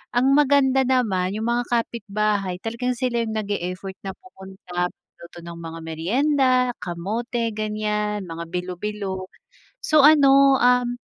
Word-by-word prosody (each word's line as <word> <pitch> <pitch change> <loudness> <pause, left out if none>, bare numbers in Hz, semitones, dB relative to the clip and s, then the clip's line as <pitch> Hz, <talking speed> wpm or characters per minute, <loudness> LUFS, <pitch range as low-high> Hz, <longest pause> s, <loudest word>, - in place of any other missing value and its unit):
ang 255 +3 +3
maganda 275 -2 +4
naman 200 -8 +1
yung 220 - -4
mga 240 0 -1
kapitbahay 210 -5 -1
talagang 245 +2 -2
sila 245 -1 -1
yung 220 -1 -4
nag 215 -2 -3
e-effort 185 0 -4
na 195 -1 -6
pumunta, 190 - -6
magluto 170 0 -16
ng 170 0 -9
mga 165 0 -7
meryenda, 255 - +1 0.3
kamote, 225 +7 -3
ganiyan, 210 -1 -2
mga 165 -1 -7
bilo-bilo. 185 +2 -4 0.5
So, 310 - +4
ano, 275 -2 +6
um, 245 0 +3
215 Hz, 130 wpm, -23 LUFS, 185-250 Hz, 0.5 s, ano